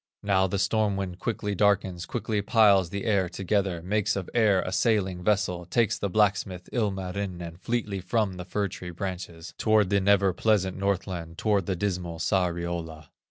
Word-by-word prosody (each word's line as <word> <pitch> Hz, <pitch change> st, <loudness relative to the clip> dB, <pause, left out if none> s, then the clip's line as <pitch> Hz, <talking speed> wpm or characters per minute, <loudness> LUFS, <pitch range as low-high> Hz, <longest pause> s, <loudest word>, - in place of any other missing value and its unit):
Now 95 Hz, -2 st, +3 dB
the 100 Hz, -, -2 dB
storm 100 Hz, +1 st, +1 dB
wind 95 Hz, -2 st, -4 dB
quickly 105 Hz, -1 st, -2 dB
darkens, 95 Hz, -3 st, +1 dB
Quickly 110 Hz, -3 st, -2 dB
piles 100 Hz, -4 st, +4 dB
the 100 Hz, +4 st, -4 dB
air 100 Hz, -5 st, +2 dB
together, 95 Hz, -2 st, -1 dB
Makes 105 Hz, +2 st, 0 dB
of 95 Hz, -3 st, -5 dB
air 105 Hz, -5 st, +3 dB
a 90 Hz, -, -4 dB
sailing 95 Hz, -4 st, +1 dB
vessel, 90 Hz, -3 st, +1 dB
Takes 110 Hz, +5 st, +1 dB
the 100 Hz, -, -1 dB
blacksmith, 95 Hz, -2 st, +1 dB
Ilmarinen, 95 Hz, -5 st, -3 dB
Fleetly 110 Hz, -3 st, -2 dB
from 100 Hz, +1 st, 0 dB
the 90 Hz, -1 st, -7 dB
fir 100 Hz, +2 st, -1 dB
tree 90 Hz, -1 st, -8 dB
branches, 85 Hz, -2 st, -6 dB
Toward 110 Hz, -3 st, +3 dB
the 100 Hz, -1 st, +3 dB
never 100 Hz, -1 st, +3 dB
pleasant 95 Hz, -1 st, +1 dB
Northland, 95 Hz, -4 st, -2 dB
Toward 100 Hz, -5 st, +1 dB
the 95 Hz, -, 0 dB
dismal 90 Hz, -3 st, -3 dB
Sariola. 85 Hz, -3 st, -2 dB
95 Hz, 160 wpm, -27 LUFS, 90-105 Hz, -, piles